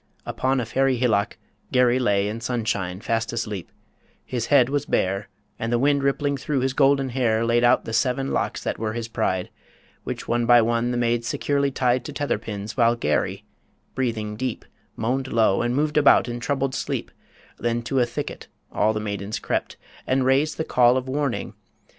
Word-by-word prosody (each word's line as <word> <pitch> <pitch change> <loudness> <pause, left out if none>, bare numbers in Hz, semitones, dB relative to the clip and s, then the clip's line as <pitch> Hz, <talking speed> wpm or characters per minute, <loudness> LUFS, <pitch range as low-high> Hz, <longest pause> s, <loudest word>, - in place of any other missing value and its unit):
Upon 130 0 0
a 120 - -2
fairy 130 +2 +1
hillock 115 -5 +1 0.3
Garry 125 0 +3
lay 100 -5 +2
In 110 +2 -4
sunshine 105 -6 -2
fast 115 0 -1
asleep: 105 -6 -4 0.5
his 120 -2 -3
head 135 -4 +5
was 140 +1 -2
bare, 95 +2 0 0.3
And 115 +1 -2
the 120 - +3
wind 140 +3 +2
rippling 140 +1 0
through 135 -1 -1
his 130 0 0
golden 135 -1 +3
hair 115 -3 +1
Laid 120 +1 +2
out 120 +1 +4
the 115 - -5
seven 130 +3 0
locks - - -2
that - - -3
were 110 0 -2
his 115 0 -4
pride, 95 -6 -1 0.5
Which - - -5
one 120 0 0
by 120 0 +7
one 115 +1 +1
the 120 - -1
maids 120 -1 0
securely 140 -1 0
tied 125 -2 +1
To 150 - -6
tether 145 -6 -1
pins, 105 -1 -6
while 120 -2 +3
Garry, 120 - -1 0.5
breathing 110 -5 -2
deep, 125 0 -4 0.3
Moaned 130 +4 -2
low, 110 -4 +3
and 120 +1 0
moved 150 +2 0
about 145 -4 +5
in 120 0 -4
troubled 135 +1 -1
sleep - - -3 0.5
Then 120 0 -1
to 135 +3 0
a 120 - +4
thicket 120 - -6 0.2
all 110 +1 +2
the 110 - -2
maidens 100 0 -4
crept, - - -3 0.3
And 130 0 +2
raised 140 +4 +2
the 160 - -1
Call 125 0 +4
of 130 0 -3
Warning 140 -1 -2
120 Hz, 185 wpm, -24 LUFS, 115-135 Hz, 0.5 s, by